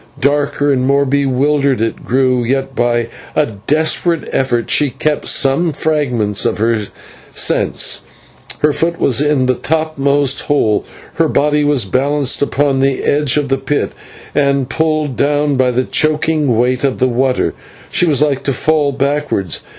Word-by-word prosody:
Darker 145 +1 +1
and 130 -1 0
more 140 +1 +2
bewildered 140 0 +1
it 115 0 -3
grew, 130 0 +1
yet 135 +2 -2
by 120 -1 0 0.3
a 150 - +3 0.2
desperate 160 +2 +1
effort 120 -3 -1
she 145 -1 +3
kept 150 +4 -2
some 145 +5 +2
fragment 125 -10 0
of - - 0
her 110 -1 0 0.4
sense. - - +1 0.6
Her 150 -1 +3
foot 165 +3 -1
was 135 +1 +2
in 145 -3 +1
the 130 - +2
topmost 145 -2 0
hole, 110 -8 +1 0.3
her - - +3
body 150 0 +1
was 145 -6 +2
balanced 140 +5 0
upon 145 -1 +1
the 135 0 0
edge 145 -1 +1
of 145 -2 -1
the 135 -1 0
pit, 145 +2 -2 0.4
and, 140 -2 +1
pulled 155 -4 -1
down 145 0 +1
by 130 -1 +2
the 125 +1 0
choking 155 -4 +1
weight 125 +2 +1
of 135 -2 0
the 130 - +2
water, 130 +1 0 0.4
she 175 - +2
was 150 -2 +2
like 140 -3 0
to 140 - +1
fall 145 +2 +1
backwards. 140 - -1
140 Hz, 155 wpm, -15 LUFS, 130-150 Hz, 0.6 s, a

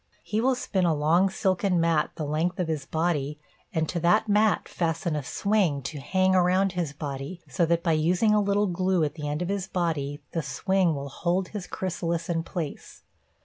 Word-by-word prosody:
He 215 +1 -1
will 260 +2 +3
spin 195 -6 -1
a 165 -3 +3
long 165 +6 +3
silken 190 -2 +1
mat 165 -2 +2
the 155 - -3
length 160 +5 -1
of 180 - 0
his 155 -4 -3
body 150 -3 -1 0.3
and 160 -1 0
to 175 - -2
that 210 +7 +3
mat 210 0 +3
fasten 165 -1 -1
a 150 - -1
swing 175 -1 0
to 150 +1 -5
hang 185 +6 +2
around 185 +1 +3
his 175 -5 -2
body, 145 +3 -6
so 150 +5 +1
that 170 0 +1
by 170 - +2
using 175 +7 +3
a 210 - +4
little 200 +1 +2
glue 185 -1 +1
at 145 -1 -1
the 150 -2 -5
end 150 +4 -2
of 175 - -4
his 200 -2 -2
body 150 -6 -2
the 165 - -1
swing 180 +5 +1
will 140 0 -5
hold 180 +6 -1
his 205 -4 -6
chrysalis 170 -2 -3
in 165 -1 +1
place. 165 -3 -6
170 Hz, 200 wpm, -26 LUFS, 155-190 Hz, 0.3 s, a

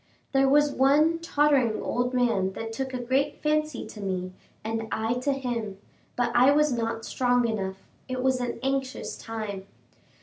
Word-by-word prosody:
There 270 -1 +3
was 295 +1 +4
one 295 +5 +3
tottering 285 -8 +2
old 245 0 -1
man 230 -7 +1
that 225 +3 -5
took 265 +3 -3
a 255 - -3
great 265 +4 0
fancy 305 -3 0
to 210 - -10
me, 185 -2 -3 0.3
and 225 0 -3
I 220 +1 0
to 280 +3 0
him, 240 -7 -3 0.4
but 240 -1 0
I 250 +3 +6
was 300 -1 +3
not 225 -1 -2
strong 245 -1 +2
enough 195 -4 -4 0.2
it 255 0 -3
was 260 -1 +2
an 245 - -3
anxious 270 -1 -2
time! 210 -4 -6
245 Hz, 165 wpm, -27 LUFS, 225-270 Hz, 0.4 s, I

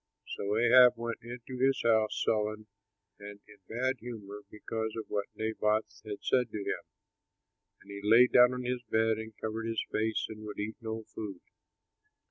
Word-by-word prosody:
So 105 +2 -1
Ahab 125 +2 +7
went 115 -1 -4
into 125 +2 -8
his 135 0 +3
house 110 -2 +2
sullen 110 0 0 0.5
and 100 0 -9
in 105 - -16
bad 130 +3 0
humor 105 -4 -8
because 110 +1 -4
of 110 - -4
what 100 -1 -2
Naboth 110 0 -1
had 105 -2 -7
said 125 -2 +2
to 110 - -5
him. 100 - -3 1.0
And - - -13
he 100 0 -7
lay 115 +4 +7
down 125 0 +6
on 125 0 -4
his 125 0 -2
bed 110 0 +2
and 110 -1 -8
covered 110 +1 -4
his 115 -1 -1
face 110 0 0
and 110 0 -9
would 105 -1 -7
eat 105 +2 -4
no 110 0 -4
food. 100 -5 -7
110 Hz, 170 wpm, -31 LUFS, 105-120 Hz, 1.0 s, Ahab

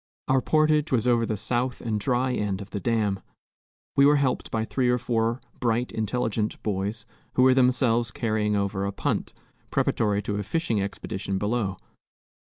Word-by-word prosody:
Our 130 0 +3
portage 155 +1 +2
was 125 -4 +2
over 120 -2 +3
the 110 - -1
south 120 +4 -1
and 110 -3 -2
dry 125 +2 +1
end 105 -5 -1
of 100 -1 -9
the 100 - -3
dam. 105 -3 0 0.8
We 140 - +5
were 145 +1 +6
helped 135 -3 0
by 110 -1 -1
three 125 +1 0
or 125 - +3
four 115 0 0 0.2
bright, 120 0 0
intelligent 110 -1 -1
boys, 105 +2 -2 0.3
who 125 - +4
were 130 0 +7
themselves 125 -2 +3
carrying 110 -3 0
over 100 -1 -1
a 100 - -1
punt, 100 - -2 0.3
preparatory 105 -2 +1
to 105 +1 -2
a - - -1
fishing 120 - 0
expedition 95 -1 -3
below. 105 -2 -1
115 Hz, 170 wpm, -26 LUFS, 105-125 Hz, 0.8 s, were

